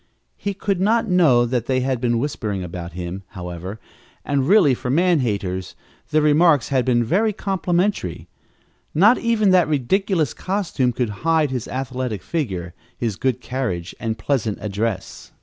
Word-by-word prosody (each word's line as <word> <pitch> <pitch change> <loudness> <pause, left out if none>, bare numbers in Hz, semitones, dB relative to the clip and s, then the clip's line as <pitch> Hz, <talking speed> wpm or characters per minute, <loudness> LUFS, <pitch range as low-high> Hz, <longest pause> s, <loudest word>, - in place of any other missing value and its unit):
He 200 -1 -4
could 195 -1 -1
not 225 +3 +2
know 160 - +4
that 120 -1 -2
they 130 -1 +1
had 130 -2 -1
been 120 -1 +1
whispering 110 -7 -2
about 85 -1 -7
him, 90 +2 -5 0.2
however, 90 +3 -6 0.5
and 140 -2 0
really, 185 -8 +5
for 125 - -4
man 170 +4 +3
haters, 95 -6 -2 0.3
their 155 0 +2
remarks 150 -3 +4
had 130 -3 +1
been 120 -2 +3
very 205 - +2
complimentary. 185 - -1 0.7
Not 210 +10 +5
even 225 -4 +2
that 185 -2 +5
ridiculous 155 - +1
costume 185 -10 -1
could 120 -1 -1
hide 160 -3 +2
his 125 -3 -3
athletic 130 -4 -4
figure, 95 - -3 0.2
his 115 -4 -2
good 125 +3 -1
carriage 95 -11 -3
and 115 -1 -2
pleasant 110 -2 -1
address. 105 -1 -4
130 Hz, 150 wpm, -21 LUFS, 110-175 Hz, 0.7 s, really